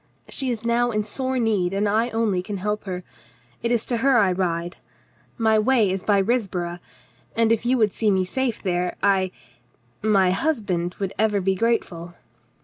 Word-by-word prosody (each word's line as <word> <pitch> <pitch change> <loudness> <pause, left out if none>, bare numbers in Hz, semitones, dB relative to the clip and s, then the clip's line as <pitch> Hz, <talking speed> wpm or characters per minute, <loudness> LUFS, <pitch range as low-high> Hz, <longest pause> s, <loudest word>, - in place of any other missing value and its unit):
She 265 -2 -2
is 235 -2 -3
now 240 +1 +2
in 215 -2 0
sore 260 +5 -2
need, 205 -6 +1
and 200 +1 +1
I 220 +4 +1
only 220 -5 0
can 200 +2 -5
help 210 +3 -3
her. 180 -2 -4 0.6
It 235 - -1
is 235 -2 +1
to 240 - -1
her 265 +2 +3
I 200 -5 +4
ride. 175 -1 -2 0.6
My 220 -2 +3
way 220 -3 +3
is 190 0 -3
by 205 -2 +3
Risborough, 190 -6 -1 0.6
and 230 -1 +3
if 230 +1 +1
you 255 +1 +3
would 215 -4 +2
see 220 - +1
me 190 -2 +2
safe 260 +3 -2
there, 180 -2 -1
I 190 -2 +3 0.4
— 120 0 -39 0.2
my 185 -1 +4
husband 185 - -1
would 195 -2 -3
ever 215 -2 +2
be 195 0 +1
grateful." 180 -5 -1
210 Hz, 185 wpm, -23 LUFS, 185-230 Hz, 0.6 s, I